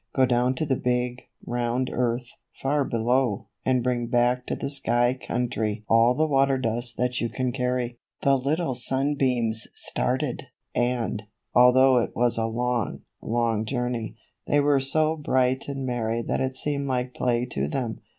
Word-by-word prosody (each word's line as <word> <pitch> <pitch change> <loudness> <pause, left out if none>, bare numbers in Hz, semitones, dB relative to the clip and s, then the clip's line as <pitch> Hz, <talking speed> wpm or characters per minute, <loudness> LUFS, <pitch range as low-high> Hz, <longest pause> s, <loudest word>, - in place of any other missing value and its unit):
Go 130 - +5
down 125 +1 +2
to 155 - -1
the 135 -3 +1
big, 125 0 -1 0.2
round 120 +1 -1
earth, 120 0 -1 0.3
far 140 +1 +1
below, 115 -3 0
and 130 -2 +1
bring 120 -1 0
back 120 +1 +1
to - - -1
the 140 - -4
sky 120 -3 +2
country 115 -4 -2
all 115 +2 +4
the 155 - +2
water 135 -2 +3
dust 120 -1 -1
that 125 0 0
you 120 - 0
can 130 +1 -2
carry." 125 -2 -2 0.2
The 140 0 +5
little 140 +3 0
sunbeams 130 -4 +1
started, 130 +1 -2 0.3
and, 120 -3 -1 0.3
although 125 +1 +6
it 115 - -3
was 120 -1 +1
a 115 - +1
long, 120 -1 -1 0.2
long 115 -2 0
journey, 125 -1 -3 0.3
they 145 - +3
were 145 -1 +3
so 155 +4 +1
bright 130 -3 +1
and 135 -1 -4
merry 115 -2 -1
that - - -1
it 130 0 -2
seemed 140 -1 -1
like 125 -1 -1
play 120 -1 0
to 70 +1 -1
them. 115 - -3
125 Hz, 160 wpm, -25 LUFS, 120-130 Hz, 0.3 s, although